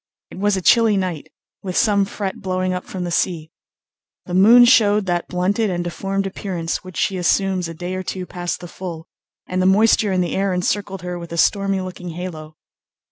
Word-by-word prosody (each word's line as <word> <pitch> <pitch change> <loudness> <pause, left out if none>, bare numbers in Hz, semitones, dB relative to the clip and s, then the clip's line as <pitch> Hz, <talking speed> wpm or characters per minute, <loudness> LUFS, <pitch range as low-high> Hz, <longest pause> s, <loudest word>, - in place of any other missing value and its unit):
It - - -9
was 205 0 +1
a 185 - -4
chilly 225 -1 +5
night, 180 -5 -3 0.3
with 185 -2 -4
some 200 -3 +3
fret 195 -1 -5
blowing 185 -1 -1
up 180 - -4
from 185 -2 -5
the 175 - -3
sea. 165 -2 -1 0.7
The 175 - -7
moon 225 +7 +7
showed 210 -4 +4
that 175 -2 -1
blunted 200 +5 0
and 175 -1 -2
deformed 195 +3 -3
appearance 185 -4 -3
which 185 -2 -10
she 190 - 0
assumes 185 0 +1
a 165 - -8
day 180 +3 -5
or 185 - -3
two 185 0 -5
past 175 -1 -4
the 175 - -7
full, 170 -2 -7 0.4
and 185 0 -2
the 185 - +3
moisture 210 +1 +4
in 185 -1 +1
the 175 - -2
air 195 0 0
encircled 195 +1 -2
her 180 0 -4
with 170 -1 -9
a 170 - -4
stormy 195 +1 +2
looking 180 -1 -7
halo. 160 -3 -7
185 Hz, 200 wpm, -20 LUFS, 175-195 Hz, 0.7 s, moon